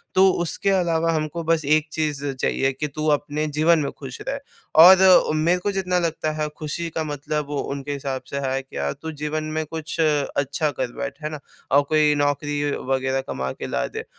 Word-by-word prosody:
तो 190 +1 +6
उसके 175 +3 -1
अलावा 165 -3 +2
हमको 155 +1 -2
बस 165 -1 +1
एक 155 +2 +3
चीज़ 150 -3 -2 0.2
चाहिए 135 0 +1
कि 150 +3 -3
तू 155 +2 -5
अपने 145 +1 -3
जीवन 155 +3 +3
में 140 -2 -2
खुश 130 -2 -8
रह। 275 +1 -2 0.4
और 185 +2 +10 0.4
मेरे 165 +3 +2
को 205 +3 -1
जितना 185 -2 0
लगता 165 -2 -1
है 150 - +1
खुशी 160 +2 -4
का 160 - 0
मतलब 150 0 -3
वो 145 0 -3
उनके 140 0 -4
हिसाब 135 -2 -4
से 140 - -4
है 135 +1 -1
क्या, 70 - -4
तू 160 - -7
जीवन 150 +1 -3
में 155 0 -3
कुछ 160 +2 -6
अच्छा 145 -1 +1
कर 130 -2 -3
बैठ। 140 +1 -5
है 155 - -2
ना? 155 -1 -6 0.3
और 140 +2 +6
कोई 150 -1 +4
नौकरी 145 0 0 0.2
वग़ैरह 135 0 0
कमा 65 0 -3
के - - -6
ला 60 - -1
दे - - -6
150 Hz, 200 wpm, -23 LUFS, 140-160 Hz, 0.4 s, और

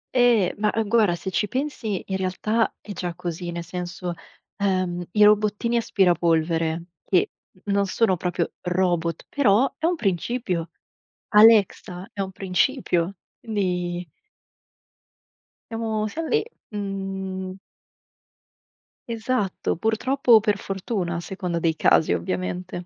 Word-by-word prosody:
Ehm, 240 -6 +4
ma, 210 0 +2
ehm, 225 -1 -1
guarda, 215 -6 +4
se 190 +2 -5
ci 210 - 0
pensi 255 -6 -3
in 190 - -1
realtà 210 +5 0
è 210 - -9
già 175 -2 -4
così: 175 0 -5
nel 170 0 -4
senso, 180 0 -5 0.4
ehm, 185 -3 0
i 210 +1 +4
robottini 210 +2 +3
aspirapolvere, 165 -5 +2 0.2
che 185 - +2 0.3
non 200 -1 +1
sono 190 0 +2
proprio 175 -1 -2
robot, 175 -2 0
però 260 -1 +3
è 315 - -1
un 355 - +1
principio. 190 - -1 0.6
Alexa 210 -4 +4
è 200 - -6
un 190 -1 -2
principio, 190 -1 0 0.3
quindi 180 -5 -2 1.6
siamo 220 -1 -1
siamo 320 +9 -4
lì, 440 -1 +2 0.3
mhmm. 195 -2 -4 1.5
Esatto, 230 -3 -1
purtroppo 240 +7 0
o 225 - +10
per 210 -1 +1
fortuna 190 -2 -3
a - - -2
seconda 180 -1 -3
dei 165 -1 +1
casi 160 - +4
ovviamente. 90 - -3
190 Hz, 120 wpm, -24 LUFS, 175-220 Hz, 1.6 s, o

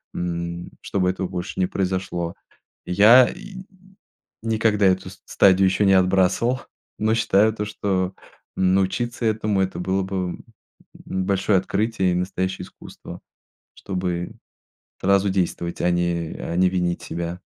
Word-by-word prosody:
м, 85 0 -4
чтобы 90 -2 0
этого 95 0 -2
больше 90 +1 -5
не 90 - +2
произошло. 95 -3 -2 0.5
Я 110 +7 +7
и 200 - -9
н 190 - -9 0.8
никогда 110 -2 +2
эту 95 0 +1
ст 95 - -15
стадию 95 0 +4
еще 100 +2 +2
не 95 - +5
отбрасывал, 95 +7 +2 0.4
но 110 +1 +2
считаю 110 -1 +3
то, 105 -1 -3
что 95 -3 -2 0.4
научиться 95 +6 0
этому 110 -2 0
это 95 -1 -2
было 95 +1 0
бы, 95 +1 -5 0.2
м, - - -16 0.6
большое 95 +1 +1
открытие 100 -1 0
и - - -1
настоящее 95 0 -2
искусство, - - -12 0.6
чтобы 90 -2 -3 0.7
сразу 100 +1 +3
действовать, 85 -2 -2
а 90 - +3
не 85 -2 -1
а 85 - -4
не 90 0 +4
винить 90 -2 -1
себя. 85 +1 -5
95 Hz, 135 wpm, -23 LUFS, 90-100 Hz, 0.8 s, Я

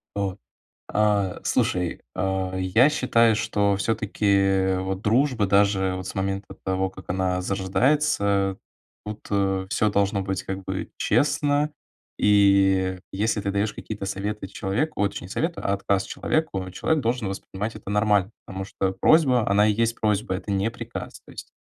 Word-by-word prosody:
Вот. 100 -2 -2 0.5
А, 105 -3 +1
слушай, 90 -2 0
а, 95 -1 -1
я 95 +9 +4
считаю, 115 -6 +3
что 105 -2 +1
всё-таки 100 -2 +1
вот 95 0 -3
дружба 115 +1 +2
даже 100 -1 +3
вот 95 0 -6
с - - -7
момента 95 +1 -3
того, 95 0 0
как 95 0 -14
она 90 0 0
зарождается, 100 0 +1 0.5
тут, 105 0 -6
э, 95 -2 0
всё 105 +1 +1
должно 100 0 +1
быть 95 0 -3
как 95 0 -5
бы - - -4
честно 145 +1 +1 0.5
и 95 -2 +4
если 105 +2 0
ты 100 - -2
даёшь 100 +1 0
какие-то 105 -2 -6
советы 100 +1 -4
человеку 105 +10 -2
ой, 100 - +3
точнее, 100 - -7
не 95 - -11
советы, 165 +1 -2
а 100 - 0
отказ 100 0 0
человеку, 95 -13 -2
человек 155 - 0
должен 120 -2 -1
воспринимать 95 +2 -5
это - - -9
нормально, 105 -1 +2
потому 95 0 -6
что 95 0 -2
просьба- 130 -8 +4
она 105 +1 +4
и 105 - +3
есть 115 +2 0
просьба, 105 -3 0
это 100 - -5
не 100 +3 0
приказ. - - -8
То - - -12
есть - - -10
100 Hz, 160 wpm, -24 LUFS, 95-110 Hz, 0.5 s, я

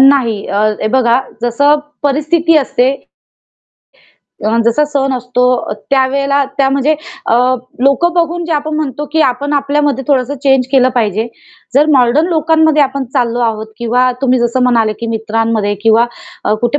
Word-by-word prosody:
नाही. 260 -6 +3
अ, 200 +1 -1 0.2
हे 215 - 0
बघा 250 -1 +3 0.2
जसं 285 +5 +2 0.3
परिस्थिती 310 +3 +1
असते 260 -2 +1 1.6
अन 230 +1 +1
जसा 235 +6 +2
सण 275 -1 0
असतो 250 0 -2 0.5
त्यावेळेला 275 +1 +1
त्या 270 -1 +3
म्हणजे 280 +3 +1 0.3
अ, - - +2 0.5
लोकं 345 +6 +2
बघून 345 0 -1
जे 335 - -3
आपण 305 +1 -2
म्हणतो, 295 -2 -3
की 320 - +1
आपण 280 +3 -1
आपल्यामध्ये 285 -1 0
थोडस 260 -2 +1
चेंज 270 -2 +2
केलं 260 -2 +4
पाहिजे. 220 -2 0 0.5
जर 290 +3 +4
मॉडर्न 260 +5 +3
लोकांमध्ये 315 -2 +2
आपण 275 0 -2
चाललो 240 -3 0
आहोत 220 -2 -1
किंवा 245 +2 +1
तुम्ही 255 -1 +2
जसं 240 +2 0
म्हणाले, 230 -3 +2
की 230 - -7
मित्रांमध्ये 225 -1 -1
किंवा 225 +1 +4 0.6
कुठे 240 +5 0
265 Hz, 145 wpm, -13 LUFS, 235-290 Hz, 1.6 s, केलं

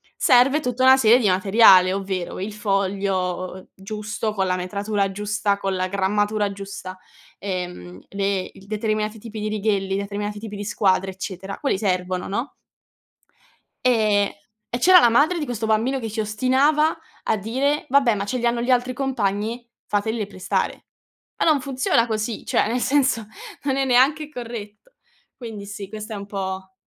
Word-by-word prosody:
serve 270 +2 +4
tutta 250 -3 -2
una 260 0 +8
serie 240 -1 +6
di 225 - +1
materiale, 190 -1 +6
ovvero 190 -3 -3
il 205 +2 -4
foglio 195 -3 -2
giusto 210 +2 -4
con 190 -2 0
la 185 - +1
metratura 200 +2 -1
giusta, 205 0 -1
con 195 -1 -2
la 185 0 -1
grammatura 205 +2 0
giusta, 195 -1 -8 0.4
ehm, 180 - -5
le 195 -1 -1
il 195 - -16
determinati 215 0 -2
tipi 220 0 -8
di 210 0 -2
righelli, 200 -2 0
determinati 205 +1 -4
tipi 210 -1 -7
di 205 0 -5
squadre 195 -2 +1
eccetera, 190 +1 -6
quelli 275 -9 0
servono, 185 -2 -1
no? 235 +8 -3 1.3
Ehm, 215 -5 +3 0.4
e 240 - -3
c'era 365 +7 +8
la 240 - +5
madre 300 +9 +3
di 295 - -2
questo 230 -3 -3
bambino 225 +5 +1
che 225 -3 -4
ci 220 +1 -2
ostinava 265 +9 +2 0.3
a 220 - +1
dire: 265 +8 -1
"Vabbè, 260 -4 +4
ma 200 - -3
ce 250 +5 -2
li 240 - -2
hanno 235 0 +1
gli 245 +2 0
altri 250 0 +2
compagni, 235 -2 -2 0.2
fatele 215 +1 -1
prestare." 190 -2 -3 0.5
Ma - - +1
non 295 -3 +3
funziona 255 -3 +1
così, 220 0 -3
cioè - - +2
nel 245 +2 -1
senso, 255 -6 +1 0.4
non 270 -1 0
è 270 - +1
neanche 270 +5 +3
corretto. 235 - -8 0.4
Quindi 220 -5 -8
sì, 200 -1 -7
questa 215 +1 -7
è - - -4
un 200 0 -7
po' 190 -1 -5
210 Hz, 165 wpm, -22 LUFS, 195-240 Hz, 1.3 s, una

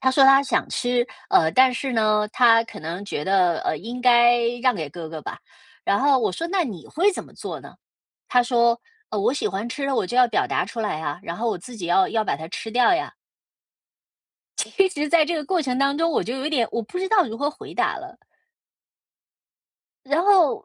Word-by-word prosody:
他 260 -1 +2
说 270 0 +5
他 270 +1 +7
想 270 - -1
吃， 245 -1 0 0.2
呃， 160 -1 +4
但 260 0 +5
是 260 +1 -3
呢， 215 -2 +2
他 230 -1 +4
可 - - -11
能 170 +5 -6
觉 150 -6 -4
得 180 -4 +2
呃， - - -1
应 240 +6 -7
该 240 -1 +5 0.2
让 255 -2 +3
给 155 -3 -5
哥 160 +2 -8
哥 160 -1 -7
吧。 - - -8 0.4
然 200 - +1
后 275 -1 +4
我 215 -5 -1
说 330 - -4
那 370 -1 0
你 195 - -8
会 380 +6 +1
怎 - - -6
么 - - -18
做 - - -7
呢？ - - -14 0.5
他 245 -1 +3
说： 235 -1 +2 0.3
“呃， 210 - -2
我 205 - +1
喜 285 - -1
欢 200 +5 -4
吃 275 +3 -4
了 275 - -1
我 190 - 0
就 240 - -5
要 250 -1 +5
表 - - 0
达 - - -1
出 230 - -8
来 210 -8 -2
呀， 150 0 -4
然 170 -4 -5
后 235 +4 -3
我 205 - -2
自 235 +8 -11
己 185 -6 -6
要 185 +2 +3
要 220 -1 -1
把 - - -1
它 160 +2 -8
吃 225 - -6
掉 245 +6 +4
呀。” 350 - -2 1.5
其 390 -1 +1
实 300 -5 -3
在 315 0 +4
这 340 - -1
个 300 - -4
过 360 +3 0
程 255 -3 -2
当 275 +1 +1
中， 330 0 +1
我 - - 0
就 240 - -4
有 265 +2 -4
一 - - -2
点 245 -7 +1
我 235 - -1
不 295 +12 -7
知 380 - -2
道 395 -6 +4
如 225 - -6
何 285 +3 -1
回 - - -12
答 - - 0
了。 - - -11 1.9
然 300 +5 +1
后， 375 -8 +3
245 Hz, 250 characters per minute, -23 LUFS, 210-280 Hz, 1.9 s, 他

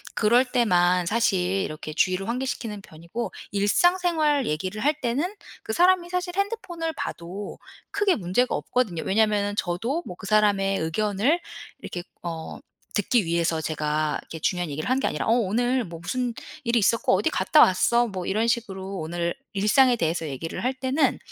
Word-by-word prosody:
그럴 235 +4 +4
때만 180 -8 +2
사실 220 -2 +2
이렇게 180 -4 -2
주의를 185 +4 +1
환기시키는 235 -4 -3
편이고 170 +7 -6 0.2
일상생활 305 - +2
얘기를 185 +8 -3
할 300 +1 +2
때는 285 - -1 0.3
그 220 - -4
사람이 355 +3 +4
사실 360 0 -2
핸드폰을 360 -6 -2
봐도 190 - -6 0.3
크게 405 -2 +2
문제가 205 +6 0
없거든요. 205 -10 -1
왜냐하면은 205 0 +2
저도 230 - -1
뭐 180 - -7
그 - - -10
사람의 200 -2 +3
의견을 210 - +1 0.4
이렇게 175 - -6 0.2
어 165 -2 -6 0.4
듣기 210 +1 +2
위해서 170 -1 0
제가 150 -1 -1
이렇게 165 - -9
중요한 180 +1 -1
얘기를 145 +2 -4
한 260 +1 +2
게 - - 0
아니라 150 - -2
"어 - - +3
오늘 245 +3 +1
뭐 170 -2 -9
무슨 245 +7 -2 0.3
일이 235 -1 +1
있었고 230 +2 +2
어디 205 - +1
갔다 190 - +4
왔어." 235 +6 +4
뭐 185 -4 -5
이런 220 +4 +1
식으로 195 -5 -2
오늘 170 +1 -2 0.2
일상에 225 +6 +4
대해서 165 -3 -1
얘기를 150 - -5
할 255 +2 +1
때는 260 +3 +1
210 Hz, 360 characters per minute, -25 LUFS, 175-255 Hz, 0.4 s, 그럴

